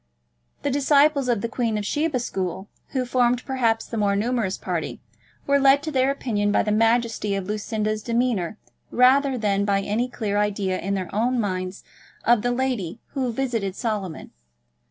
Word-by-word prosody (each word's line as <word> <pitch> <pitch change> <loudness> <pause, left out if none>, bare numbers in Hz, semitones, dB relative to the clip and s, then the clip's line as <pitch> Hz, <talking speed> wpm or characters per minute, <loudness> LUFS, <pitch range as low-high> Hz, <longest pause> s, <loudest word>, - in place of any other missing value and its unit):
The 285 - 0
disciples 280 0 +3
of 235 -4 +1
the 235 - -1
Queen 230 -2 -1
of 210 - -3
Sheba 295 +4 0
school, 190 -5 -3 0.2
who 260 -2 -2
formed, 245 0 +1
perhaps, 235 -4 +1
the 230 - -5
more 200 -2 +2
numerous 220 -2 0
party, - - -3 0.5
were 280 0 +3
led 275 +1 +5
to 310 - -3
their 265 -1 +2
opinion 215 -7 0
by - - +3
the 210 - -1
majesty 225 -1 +2
of 195 -1 -3
Lucinda's 215 +1 -2
demeanour 230 -5 0 0.3
rather 265 +2 +4
than 200 -3 +1
by 200 -1 +1
any 220 +5 -1
clear 210 -4 -2
idea 200 -2 0
in 200 +2 -2
their 185 -2 -4
own 240 +4 +1
minds 185 -2 -3 0.4
of 240 -2 +4
the 245 - 0
lady 245 -7 -2
who 260 -3 -2
visited 230 -6 -2
Solomon. 205 -8 -4
230 Hz, 170 wpm, -24 LUFS, 205-255 Hz, 0.5 s, led